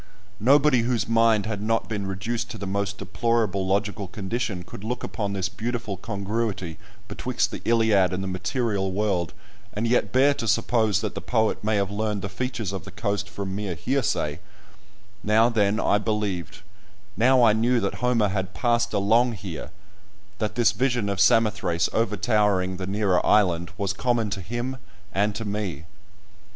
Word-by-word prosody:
Nobody 135 +3 +5
whose 115 0 0
mind 115 -2 +3
had 105 -2 -3
not 115 +1 0
been 105 -3 -3
reduced 115 +5 -3
to - - -6
the 100 - -5
most 100 +1 -2
deplorable 100 -1 0
logical 100 0 -1
condition 100 0 -3
could 95 - -10
look 125 +3 -3
upon 100 -2 -3
this 95 -1 -1
beautiful 115 -1 -4
congruity 100 -3 -3 0.3
betwixt - - -1
the - - -6
Iliad 110 -5 +3
and 95 +1 -2
the - - -3
material 95 +1 -1
world 95 -4 0 0.4
and 105 +3 -2
yet 115 -4 +2
bear 135 +3 +4
to 135 -5 -4
suppose 110 -2 +2
that - - -3
the - - -5
poet 110 -3 0
may 110 +1 +1
have 100 -1 0
learned 105 -1 -2
the 100 - -3
features 115 -1 -3
of 95 - -4
the 100 - -10
coast 100 0 -2
from 100 -2 -5
mere 100 -3 -3
hearsay; 110 - -1 0.8
now 110 +3 +4
then, 105 -2 +1
I 105 - +2
believed; 100 -4 -3 0.5
now 130 +2 +4
I 110 -2 +6
knew 120 +3 +2
that 100 +2 -3
Homer 120 -4 +2
had 95 0 -3
passed 120 -1 +1
along 115 +4 +3
here, 95 -7 -7 0.7
that 105 -1 -2
this 120 -3 +4
vision 120 -1 0
of 100 -1 -2
Samothrace 100 -5 +3
over 110 -2 0
towering 105 -3 +1
the 95 0 -5
nearer 100 -2 +1
island 85 -5 +3
was 100 -1 -1
common 115 -1 0
to 100 -1 -3
him 120 +7 -4 0.4
and 100 +1 +1
to 115 - -4
me. 100 -8 -3
105 Hz, 170 wpm, -25 LUFS, 95-115 Hz, 0.8 s, I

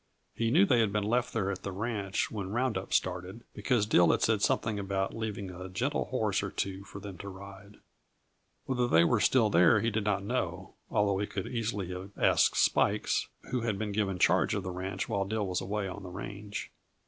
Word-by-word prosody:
He 115 0 0
knew 170 +11 +5
they 125 -11 +3
had 110 -3 +2
been 105 0 0
left 120 +4 +1
there 100 -4 0
at 95 -1 -5
the 100 - -4
ranch 100 -1 -2
when 100 -4 -4
round 120 +2 0
up 95 0 -4
started, 90 +5 -1
because 120 -6 +1
Dill 90 -5 +5
had - - +2
said 110 -2 +2
something 110 -1 +1
about 95 -1 -2
leaving 105 -4 -4
a 90 +1 -8
gentle 120 +10 -1
horse 110 -6 0
or 100 - -3
two 95 0 -3
for 100 -1 -9
them 100 -3 -9
to 100 - -6
ride. 100 +1 -11 0.9
Whether 125 -2 0
they 85 -6 +5
were 110 +6 +3
still 110 -1 +3
there 85 -2 +6
he 115 - 0
did 110 0 -1
not 100 -2 0
know, 100 - -3 0.2
although 100 -2 +2
he 100 - -1
could 95 - -4
easily 110 -6 -3
have 95 +2 -7
asked - - +3
Spikes, - - +2 0.2
who 125 -1 0
had 110 -3 -1
been 105 0 -3
given 100 -2 0
charge 90 - +3
of 100 - -2
the 95 - -4
ranch 95 +1 -4
while 100 -5 0
Dill 105 +1 -2
was 90 -1 -1
away 100 +1 -2
on 95 +2 -7
the 95 - -8
range. 100 +2 -6
100 Hz, 215 wpm, -30 LUFS, 95-110 Hz, 0.9 s, there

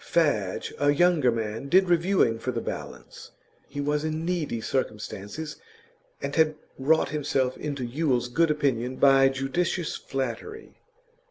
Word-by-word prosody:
Fadge, 125 - 0
a 145 - +3
younger 155 -4 +4
man, 115 +3 -4
did 185 +4 +5
reviewing 170 -9 +2
for 130 - -2
The 120 - -2
Balance; - - -7 0.4
he 145 - -7
was 150 +1 0
in 155 +1 -2
needy 170 -9 -1
circumstances, 110 +4 -4 0.7
and 140 0 -3
had 155 -1 +3 0.2
wrought 155 +3 +3
himself 135 -3 0
into 140 -4 -4
Yule's 125 -1 0
good 165 +7 +2
opinion 130 -5 0
by 135 0 +6
judicious 150 +6 -1
flattery. 135 - -5
140 Hz, 135 wpm, -26 LUFS, 125-160 Hz, 0.7 s, by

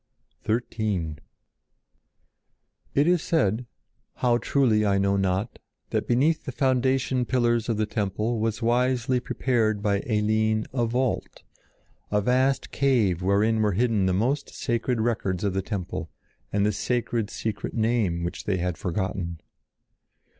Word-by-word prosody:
XIII 105 -8 -1 1.8
It 145 - +4
is 175 -1 +3
said, 120 - 0 0.5
how 120 -1 +2
truly 120 -7 +2
I 100 -1 +2
know 100 0 +2
not, 95 +3 -1 0.3
that - - -1
beneath 145 +7 +2
the - - -5
foundation 130 -1 +1
pillars 120 -2 +1
of 115 - 0
the 110 - +1
temple 105 +2 -1
was 110 +1 -1
wisely 125 +1 +2
prepared 110 -4 0
by 100 -1 +2
Eline 110 0 +1
a 120 -3 +1
vault, 125 +2 -2 0.7
a 105 - +2
vast 130 +5 +1
cave 115 -11 +2
wherein 105 +4 +2
were 105 -2 +2
hidden 110 -2 +2
the - - +2
most 130 +9 0
sacred 120 +1 -1
records 105 -5 -1
of 100 -2 0
the 95 - 0
temple 90 -3 -4 0.4
and 100 0 +2
the 105 - +3
sacred 115 +1 -1
secret 110 -2 -4
name 110 -7 +1
which 85 - -4
they 100 -3 0
had 90 -1 -2
forgotten. 90 -2 -3
110 Hz, 135 wpm, -26 LUFS, 100-125 Hz, 1.8 s, It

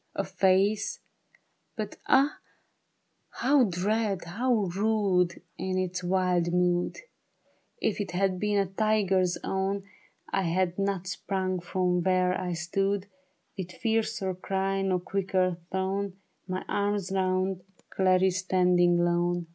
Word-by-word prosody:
A - - 0
face, 195 +2 +2 0.8
but - - -5
ah, 275 +3 +3 0.9
how 270 0 +3
dread, 200 +1 0
how 230 +10 -1 0.2
rude 195 -4 +1 0.2
In 185 0 -1
its 185 -1 -2
wild 180 -1 +1
mood! 180 0 +1 0.8
If 215 -1 0
it 200 - -4
had 185 +1 0
been 210 0 +1
a 200 - +3
tiger's 195 -2 +1
own, 195 +1 -1 0.5
1 195 - +2
had 180 +1 0
not 195 -2 -1
sprung 185 0 -2
from 180 0 0
where 185 0 +2
I 180 -1 -2
stood 195 +4 -1 0.5
With 180 -3 -6
fiercer 220 -4 -1
cry, 195 +1 -1
nor 190 -1 +1
quicker 185 -2 0
thrown 190 +1 -1 0.3
My 185 0 -3
arms 200 -2 -1
round 185 0 0 0.3
Clarice 185 -1 +3
standing 180 -2 +3
lone. 175 0 +1
190 Hz, 120 wpm, -28 LUFS, 180-200 Hz, 0.9 s, ah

